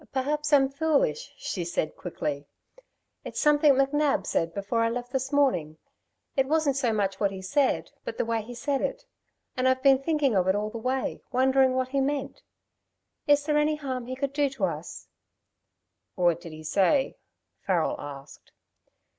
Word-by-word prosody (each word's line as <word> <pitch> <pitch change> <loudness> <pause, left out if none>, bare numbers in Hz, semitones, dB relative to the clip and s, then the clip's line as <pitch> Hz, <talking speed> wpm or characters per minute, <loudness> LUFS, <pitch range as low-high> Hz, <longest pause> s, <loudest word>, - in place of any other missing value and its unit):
"Perhaps 295 +3 -1
I'm 275 -2 +6
foolish," 315 - 0
she 200 - -4
said 170 -2 -2
quickly. 150 -5 -4 0.8
"It's - - -5
something 295 -1 +5
McNab 275 +2 +1
said 165 0 0
before 200 +5 -1
I 230 - +2
left 245 +1 -5
this 265 0 -2
morning. 180 - +1 0.6
It 270 -1 +2
wasn't 305 -2 +2
so 255 -4 +1
much 200 -3 -1
what 200 - +2
he 190 -1 -8
said, 275 +8 +1
but - - -6
the - - 0
way 230 -1 0
he 240 +3 -9
said 275 +2 -1
it. - - -3 0.5
And 255 0 +1
I've 260 0 +2
been 270 -1 +5
thinking 290 -5 +1
of 185 -1 +2
it 190 - +3
all 210 +1 -2
the 230 - -6
way 255 +3 -2
wondering 260 0 +3
what 260 0 0
he 275 +1 0
meant. 280 0 -2 0.9
Is 290 0 +4
there 300 -1 +2
any 300 +1 +2
harm 260 -5 -5
he 255 - -4
could 275 +1 -3
do 285 -1 +2
us?" 165 -3 -3 1.1
"What 175 -2 +2
did 165 - -9
he 155 0 -10
say?" 200 - +2 0.4
Farrel 180 -4 0
asked. 140 -1 -10
260 Hz, 170 wpm, -27 LUFS, 195-285 Hz, 1.1 s, I'm